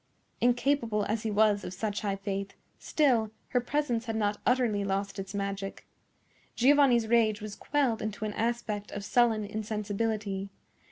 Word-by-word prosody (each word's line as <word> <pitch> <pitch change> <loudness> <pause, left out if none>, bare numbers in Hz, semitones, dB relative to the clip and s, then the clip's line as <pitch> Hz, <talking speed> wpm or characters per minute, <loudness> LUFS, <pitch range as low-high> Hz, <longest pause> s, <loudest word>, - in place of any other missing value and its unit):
Incapable 240 -3 +2
as 215 +1 -1
he 220 - -2
was 210 -1 +3
of 180 - -6
such 210 +1 -2
high 200 -2 -1
faith, 195 0 -4 0.3
still 245 -8 +2 0.2
her 250 - +2
presence 245 -3 -1
had 225 -2 -3
not 205 -1 0
utterly 240 -5 +2
lost 195 0 -2
its 195 +1 -6
magic. 195 -1 -4 0.7
Giovanni's 260 -3 +5
rage 220 -2 +3
was 210 -1 -7
quelled 270 -6 0
into 215 0 -3
an 210 - -3
aspect 225 -3 -2
of 205 0 -5
sullen 220 0 +3
insensibility. 210 -1 -2
215 Hz, 150 wpm, -29 LUFS, 205-235 Hz, 0.7 s, Giovanni's